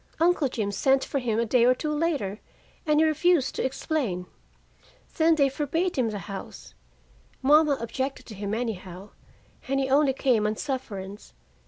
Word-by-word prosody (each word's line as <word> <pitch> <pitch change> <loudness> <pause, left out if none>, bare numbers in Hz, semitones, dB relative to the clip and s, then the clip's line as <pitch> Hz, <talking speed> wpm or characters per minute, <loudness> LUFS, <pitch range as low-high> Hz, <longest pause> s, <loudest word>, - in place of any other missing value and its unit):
Uncle 335 -3 +3
Jim 220 -5 -3
sent 265 +6 +2
for 280 - -2
him, 230 -4 -1
a 235 - +1
day 235 +1 +3
or 250 +1 +5
two 305 +3 -3
later, 295 - -1 0.5
and 300 0 +3
he 320 - +5
refused 315 -1 +2
to - - -2
explain. 260 - -2 0.9
Then 320 0 +4
they 280 -3 +4
forbade 305 +6 -1
him 245 -4 +1
the 210 - -4
house. 195 +1 -9 0.7
Mama 295 +1 +5
objected 260 +4 -4
to 220 - -10
him, 205 +1 -3
anyhow, 200 -5 -5 0.6
and 275 +1 0
he 265 -1 -1
only 280 -1 +4
came 245 -6 +2
on 215 - -1
sufferance. 210 -7 -6
265 Hz, 165 wpm, -26 LUFS, 215-300 Hz, 0.9 s, or